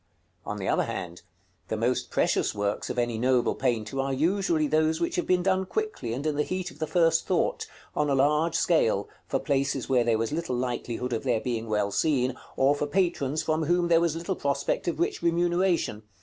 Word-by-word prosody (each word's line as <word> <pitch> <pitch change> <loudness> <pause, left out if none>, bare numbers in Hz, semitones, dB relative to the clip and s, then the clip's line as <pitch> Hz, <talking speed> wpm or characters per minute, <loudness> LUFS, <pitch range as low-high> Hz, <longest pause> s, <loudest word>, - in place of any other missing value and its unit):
§ - - -43 0.4
CXXXVII. - - -7
On - - -4
the - - -4
other - - +2
hand, 85 0 -6 0.5
the 110 - -2
most 120 +3 0
precious - - +1
works 100 0 -2
of - - -4
any 120 -2 0
noble 125 0 +2
painter 120 -1 -1
are 135 0 0
usually 165 +2 +1
those 155 +1 +2
which 340 +1 -1
have 355 - -1
been 180 -1 +2
done 190 0 +2
quickly, 430 - -3
and 130 +6 -4
in 155 -2 0
the - - +3
heat 185 +3 -3
of - - -17
the 155 - -2
first 165 -1 +2
thought, - - 0 0.3
on 150 -1 +1
a 140 - +2
large 150 +4 +2
scale, 110 - +2 0.2
for - - 0
places 135 -1 -1
where 125 -2 +4
there 115 -1 +2
was 115 +3 -2
little 160 -4 -2
likelihood 125 0 -3
of 115 - -1
their 125 -4 +1
being 115 -1 -3
well 105 -1 0
seen, 130 -2 +1 0.2
or 135 +2 +4
for 145 0 -2
patrons 160 -3 0
from 155 0 0
whom 175 +2 +2
there 165 -1 +5
was 170 -2 +1
little 170 +3 -3
prospect 140 +1 -1
of 170 - -1
rich 390 +4 0
remuneration. 175 - +1
145 Hz, 215 wpm, -27 LUFS, 125-170 Hz, 0.5 s, there